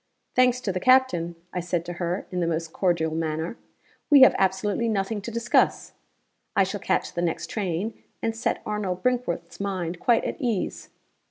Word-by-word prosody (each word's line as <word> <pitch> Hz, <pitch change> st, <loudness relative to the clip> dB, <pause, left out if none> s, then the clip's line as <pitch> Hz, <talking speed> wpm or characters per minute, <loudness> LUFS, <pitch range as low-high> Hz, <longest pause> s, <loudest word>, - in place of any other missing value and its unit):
'Thanks 250 Hz, 0 st, +4 dB
to 225 Hz, -6 st, -2 dB
the 185 Hz, -, -2 dB
captain,' 220 Hz, -9 st, +3 dB, 0.2 s
I 180 Hz, -, -1 dB
said 175 Hz, -1 st, -2 dB
to 175 Hz, -, -5 dB
her, 175 Hz, +2 st, -1 dB
in 180 Hz, -, -2 dB
the 170 Hz, -, +1 dB
most 165 Hz, -1 st, -2 dB
cordial 170 Hz, -4 st, +1 dB
manner, 160 Hz, +3 st, -2 dB, 0.5 s
'we 285 Hz, -3 st, +8 dB
have 260 Hz, -, +9 dB
absolutely 200 Hz, +4 st, +1 dB
nothing 205 Hz, 0 st, -1 dB
to 210 Hz, -, -6 dB
discuss. 235 Hz, 0 st, +1 dB, 0.6 s
I 195 Hz, -, +5 dB
shall 195 Hz, +2 st, -3 dB
catch -, -, -1 dB
the 170 Hz, -, -2 dB
next 170 Hz, -2 st, -2 dB
train, 200 Hz, +1 st, -3 dB, 0.2 s
and 225 Hz, 0 st, -2 dB
set 230 Hz, -, -1 dB
Arnold 200 Hz, -4 st, -3 dB
Brinkworth's 240 Hz, -9 st, -1 dB
mind 185 Hz, -4 st, -3 dB
quite 240 Hz, -3 st, +3 dB
at -, -, -4 dB
ease. 230 Hz, -7 st, -2 dB
190 Hz, 175 wpm, -25 LUFS, 170-230 Hz, 0.6 s, have